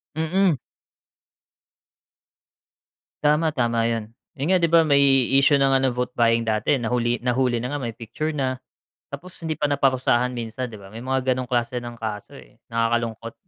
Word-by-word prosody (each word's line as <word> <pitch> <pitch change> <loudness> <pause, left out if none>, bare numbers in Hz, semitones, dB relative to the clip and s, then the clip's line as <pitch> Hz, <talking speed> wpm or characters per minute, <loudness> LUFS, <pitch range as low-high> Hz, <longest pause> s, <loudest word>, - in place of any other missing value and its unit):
Mm. 170 +2 +2 2.7
Tama, 150 +1 +2
tama 115 -3 +1
yun. 115 -1 -3 0.2
Eh, 140 - -5
ngayon 185 +3 +3
di 170 - +2
ba 165 0 +5
may 140 -2 +3 0.4
issue 140 +1 +5
ng 135 -1 +3
ano 135 0 +3
vote 125 0 -2
buying 115 -1 +2
dati 110 +5 +1
nahuli 120 -1 -1
nahuli 125 -1 +1
na 125 - -3
nga 145 - -2
may 120 -4 -5
picture 150 +7 -4
na, 130 -2 -2 0.5
tapos 170 +6 -8
hindi 160 - -1
pa 145 - +2
naparusahan 130 -3 +1
minsan 120 +1 -5
'di 105 - -10
ba, 95 - -12
may 115 +4 -9
mga 130 0 0
ganong 130 - -3
klase 120 0 -1
ng 120 -1 -6
kaso, 105 -2 -5
eh, - - -15 0.2
nakakalungkot. 115 0 -1
125 Hz, 165 wpm, -23 LUFS, 115-140 Hz, 2.7 s, ba